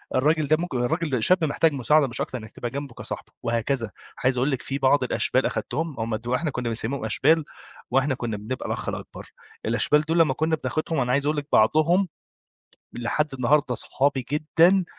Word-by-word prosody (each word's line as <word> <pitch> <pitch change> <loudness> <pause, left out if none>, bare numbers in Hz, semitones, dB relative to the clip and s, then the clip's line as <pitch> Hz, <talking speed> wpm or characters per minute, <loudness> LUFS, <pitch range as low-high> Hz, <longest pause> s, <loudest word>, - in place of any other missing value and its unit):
الراجل 155 +3 +2
ده 155 +2 +3
ممك 175 -4 -4
الراجل 130 -1 0
شاب 185 -2 +3
محتاج 155 +1 +2
مساعدة، 140 +3 +3
مش 120 - -3
أكتر 130 - -3
إنَّك 110 -1 -10
تبقى 120 - -5
جنبه 140 -1 -6
كصاحبه، - - -7
وهكذا. 115 -1 -1 0.3
عايز 130 0 +2
أقول 135 +4 +1
لِك 130 - -2
في 135 - -3
بعض 135 0 +3
الأشبال 130 +1 +1
أخدتهم، 160 -3 -2
هُم 110 0 -1
دو 120 +3 -2
إحنا 155 +1 -1
كنا 125 -2 -3
بنسمِّيهم 115 +2 -2
أشبال 155 +8 +3 0.5
وإحنا 135 +1 +2
كنا 115 -4 -3
بنبقى 120 +5 -5
الأخ - - -3
الأكبر، - - -8 0.4
الأشبال 120 +6 +3
دول 165 +2 0
لما 150 -5 +4
كنا 160 +2 +1
بناخُدهم، 155 0 -2
أنا 125 - 0
عايز 140 +2 +1
أقول 150 +1 +1
لِك 145 - -3
بعضهم 155 - +4 0.9
لحد 135 +5 -1
النهاردة 135 +1 +2
صحابي 135 0 0
جدًا، 170 +5 +3
140 Hz, 185 wpm, -24 LUFS, 125-155 Hz, 0.9 s, لما